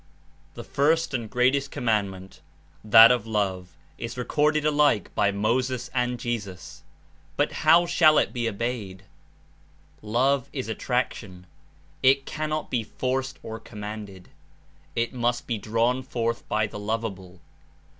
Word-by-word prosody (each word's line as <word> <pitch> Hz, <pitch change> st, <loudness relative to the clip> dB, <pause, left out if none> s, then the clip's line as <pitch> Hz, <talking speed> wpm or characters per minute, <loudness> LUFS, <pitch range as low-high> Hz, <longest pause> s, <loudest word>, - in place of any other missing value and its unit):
The -, -, -7 dB
first 160 Hz, +2 st, +1 dB
and 115 Hz, -4 st, -3 dB
greatest 130 Hz, +4 st, +1 dB
command 110 Hz, -6 st, 0 dB
Love's 95 Hz, -1 st, -9 dB
ment, 95 Hz, 0 st, -16 dB, 0.5 s
that 115 Hz, +1 st, +10 dB
of 120 Hz, -3 st, 0 dB
love, 95 Hz, -5 st, -2 dB, 0.2 s
is 115 Hz, +1 st, -6 dB
recorded 150 Hz, +4 st, +1 dB
alike 145 Hz, -, +2 dB
by 100 Hz, -, +2 dB
Inspiration 100 Hz, 0 st, -2 dB
Moses 125 Hz, +2 st, 0 dB
and 125 Hz, -1 st, -1 dB
Jesus, 105 Hz, -7 st, -5 dB, 0.5 s
but -, -, +1 dB
how 165 Hz, +3 st, +4 dB
shall 155 Hz, -3 st, +5 dB
it -, -, +2 dB
be 120 Hz, -2 st, -1 dB
obeyed? 105 Hz, -4 st, -4 dB, 1.0 s
Love 130 Hz, +5 st, +1 dB
is 130 Hz, -5 st, -4 dB
attraction; 110 Hz, -6 st, -3 dB, 0.6 s
it 135 Hz, +1 st, +4 dB
cannot 155 Hz, 0 st, -3 dB
be 120 Hz, -3 st, 0 dB
forced 130 Hz, +4 st, -3 dB
or 110 Hz, 0 st, -6 dB
commanded; 105 Hz, -4 st, -9 dB, 0.7 s
it 115 Hz, +1 st, -1 dB
must 120 Hz, -1 st, -1 dB
be 115 Hz, -3 st, -3 dB
drawn 115 Hz, +5 st, 0 dB
forth 115 Hz, -3 st, -3 dB
by 105 Hz, 0 st, +1 dB
the 105 Hz, -, -7 dB
lovable. 100 Hz, -4 st, -4 dB
120 Hz, 135 wpm, -25 LUFS, 105-130 Hz, 1.0 s, that